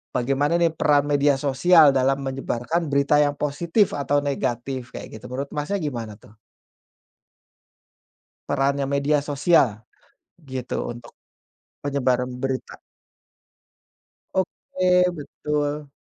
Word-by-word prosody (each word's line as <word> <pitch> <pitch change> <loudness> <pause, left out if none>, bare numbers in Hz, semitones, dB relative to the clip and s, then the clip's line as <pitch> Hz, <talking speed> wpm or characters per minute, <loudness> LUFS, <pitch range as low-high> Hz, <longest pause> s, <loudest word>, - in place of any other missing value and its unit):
bagaimana, 140 +5 +1
nih, 170 -1 +3
peran 145 -2 +3
media 145 -1 +3
sosial 145 +3 +5
dalam 135 +1 +2
menyebarkan 135 +4 -2
berita 140 +1 +3
yang 145 -1 +1
positif 170 +8 +1
atau 145 0 +1
negatif, 130 -2 -3
kayak 110 - -8
gitu, - - -14
menurut 140 +2 -4
Masnya 150 +7 -2
gimana, 120 -8 -4
tuh? 110 0 -20 2.1
Perannya 140 0 +1
media 145 +2 +2
sosial, 140 -6 +2 0.6
gitu, 130 -2 -5 0.2
untuk 120 0 -13 0.7
penyebaran 130 -3 0
berita. 130 0 -4 1.5
Oke, 185 -1 +1
betul. 150 0 -3
140 Hz, 100 wpm, -23 LUFS, 130-150 Hz, 2.1 s, sosial